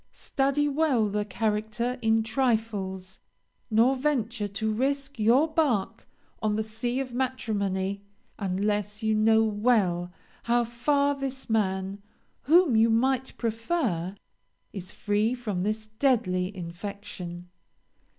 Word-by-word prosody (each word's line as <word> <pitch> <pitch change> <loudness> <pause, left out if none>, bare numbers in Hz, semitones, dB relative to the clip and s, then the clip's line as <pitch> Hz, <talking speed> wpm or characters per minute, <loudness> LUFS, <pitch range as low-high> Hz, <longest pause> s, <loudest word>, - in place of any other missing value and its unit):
Study 275 +1 0
well 280 -6 +2
the 210 +1 -1
character 220 +4 -1
in 225 -1 +3
trifles; 215 -6 -1 0.5
nor 235 +4 +4
venture 245 -6 -1
to 215 +2 -2
risk 270 +2 -1
your 240 +8 +4
bark 300 -11 0 0.3
on 215 -1 +1
the 220 - 0
sea 225 +4 -2
of 260 -2 -4
matrimony, 200 -7 -1 0.4
unless 205 +2 -1
you 220 0 +2
know 220 +1 +4
well 205 -5 +1 0.3
how 240 +1 +3
far 280 +5 +1
this 270 -3 -5
man, 195 -2 0 0.4
whom 320 -2 +5
you 225 +1 +5
might 260 +3 +1
prefer, 225 - -1 0.6
is 185 -1 -6
free 210 +4 0
from 210 -7 -3
this 215 +3 -1
deadly 215 -6 +1
infection. 175 0 -7
220 Hz, 115 wpm, -27 LUFS, 205-255 Hz, 0.6 s, whom